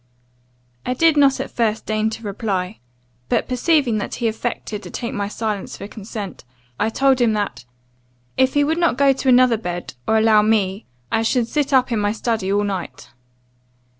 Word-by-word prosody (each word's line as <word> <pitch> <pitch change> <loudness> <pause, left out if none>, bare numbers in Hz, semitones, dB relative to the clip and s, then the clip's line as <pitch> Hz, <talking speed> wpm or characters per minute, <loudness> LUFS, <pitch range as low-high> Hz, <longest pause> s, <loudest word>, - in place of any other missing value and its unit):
"I 250 - -2
did 325 +3 +4
not 280 -2 +4
at - - -4
first 225 -2 -1
deign 215 0 0
to 225 +1 -8
reply. 200 -2 -3 0.5
But - - +1
perceiving 255 -3 +2
that - - -4
he 235 - -1
affected 220 -2 -4
to - - -9
take 235 -2 -5
my 200 -1 -2
silence 210 -1 -4
for - - -7
consent, 205 - -7 0.4
I - - +2
told 265 +2 +2
him 230 -2 +3
that, 205 -10 -3 0.7
'If 260 +1 +2
he 290 - +4
would 320 +3 0
not 340 -7 +2
go 280 -1 +5
to 265 0 -1
another 250 -2 +5
bed, 175 -4 -5
or 220 - +3
allow 220 -1 +5
me, 210 -2 0 0.2
I 225 - +2
should 230 +1 +1
sit 290 +2 -1
up 255 -2 +3
in 225 - +1
my 205 0 +1
study 220 -4 -1
all 205 +1 +2
night. 195 -3 -5
225 Hz, 185 wpm, -20 LUFS, 205-255 Hz, 0.7 s, go